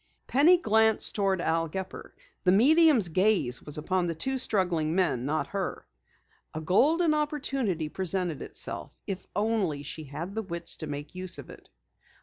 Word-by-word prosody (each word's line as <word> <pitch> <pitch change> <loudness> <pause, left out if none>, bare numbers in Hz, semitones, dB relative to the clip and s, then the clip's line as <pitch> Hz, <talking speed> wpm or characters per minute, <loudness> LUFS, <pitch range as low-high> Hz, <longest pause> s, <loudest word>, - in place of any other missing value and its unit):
Penny 310 +8 +5
glanced 220 -7 +3
toward 195 -3 0
Al 165 -1 0
Gepper. 190 +3 -7 0.3
The 180 - +4
medium's 270 - +5
gaze 185 - +2
was 150 - -3
upon 180 +3 -1
the 165 - -3
two 265 +11 -2
struggling 175 -9 +1
men, 140 -10 +1
not 155 +2 -1
her. 195 -2 -3 0.7
A - - -2
golden 305 - +3
opportunity 275 - -1
presented 180 -2 -2
itself, - - -4
if 190 -2 -5
only 205 -9 0
she 155 +2 -7
had 155 +7 -6
the 220 - -2
wits 170 -4 -4
to 155 - -5
make 145 0 -6
use 185 0 -4
of - - -10
it. - - -15
185 Hz, 155 wpm, -28 LUFS, 160-220 Hz, 0.7 s, Penny